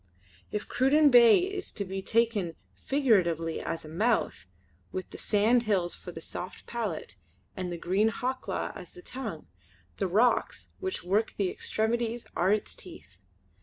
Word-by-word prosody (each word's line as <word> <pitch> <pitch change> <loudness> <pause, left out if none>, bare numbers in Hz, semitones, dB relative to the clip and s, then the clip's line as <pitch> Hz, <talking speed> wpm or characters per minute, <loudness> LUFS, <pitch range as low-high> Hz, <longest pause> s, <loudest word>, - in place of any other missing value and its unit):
If 210 - -3
Cruden 285 +3 +4
Bay 235 -2 +8
is 385 +2 -2
to 200 - -3
be 190 +1 -4
taken 215 -6 +1 0.2
figuratively 180 - +1
as 165 - -4
a - - -9
mouth, 175 - 0 0.4
with 185 -1 -5
the - - -8
sand 220 +4 +3
hills 180 -4 +2
for 180 - -9
soft 180 +2 -7
palate, 205 - -4 0.4
and 180 -1 -3
the 175 - -4
green 195 +6 +2
Hawklaw 255 +3 -3
as - - -10
the 360 - -13
tongue, 225 - -6 0.5
the - - 0
rocks 220 +7 +1
which 380 0 -3
work 205 +5 +1
the 195 -3 +1
extremities 230 +1 -1
are 185 +3 +3
its 210 0 0
teeth. 90 +3 -12
215 Hz, 150 wpm, -29 LUFS, 180-240 Hz, 0.5 s, Bay